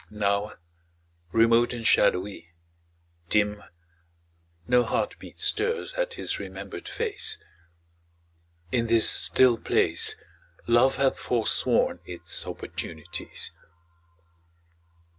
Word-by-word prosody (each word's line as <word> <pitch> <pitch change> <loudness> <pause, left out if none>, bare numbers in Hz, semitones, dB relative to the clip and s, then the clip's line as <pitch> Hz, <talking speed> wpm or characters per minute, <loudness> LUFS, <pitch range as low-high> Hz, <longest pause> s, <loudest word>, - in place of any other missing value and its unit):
Now, 100 0 -1 0.8
remote 115 +2 +4
and 115 -2 -6
shadowy, 90 -5 +2 0.8
dim, 105 0 +1 1.1
No 125 0 +4
heartbeat 110 - -3
stirs 460 +3 0
at - - -2
his - - -3
remembered - - -8
face. 440 -3 -1 1.3
In 115 -2 +1
this 115 -1 +4
still 125 -3 +4
place - - +1 0.5
Love 120 +3 +4
hath 135 -1 +1
forsworn 115 -3 +2
its 90 -1 -4
opportunities. 85 +2 -6
115 Hz, 85 wpm, -26 LUFS, 105-130 Hz, 1.3 s, remote